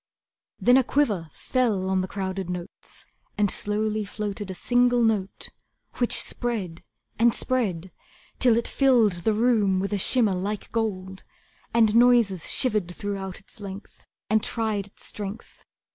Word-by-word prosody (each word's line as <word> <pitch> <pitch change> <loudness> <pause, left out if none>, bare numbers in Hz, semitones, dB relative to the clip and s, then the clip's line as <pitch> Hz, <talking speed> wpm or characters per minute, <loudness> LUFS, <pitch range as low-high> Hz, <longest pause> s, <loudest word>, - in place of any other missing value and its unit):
Then 245 +1 +5
a 265 - +4
quiver 215 - 0
fell 220 - -1
on 190 0 +1
the 185 - -3
crowded 190 -2 -4
notes, 180 -1 -7 0.3
And 205 -2 +2
slowly 215 +1 -1
floated 205 -1 -5
A 190 - -5
single 245 +3 +2
note 210 -4 -1 0.5
which 245 - +3
spread 205 -9 -2 0.4
and 235 0 +4
spread 190 -9 -1 0.5
Till 240 -3 +5
it 235 - -1
filled 250 -6 +4
the 220 +4 +1
room 215 -5 +2
with 195 +2 -2
a 205 - 0
shimmer 220 0 +2
like 200 +3 -4
gold, 190 -4 -3 0.5
And 225 -2 +3
noises 235 -7 +4
shivered 210 -8 +1
throughout 195 -2 -5
its 200 - -9
length, 200 0 -10 0.2
And 220 0 +2
tried 215 -4 -1
its 200 - -10
strength. 205 +2 -6
210 Hz, 145 wpm, -25 LUFS, 190-235 Hz, 0.5 s, Then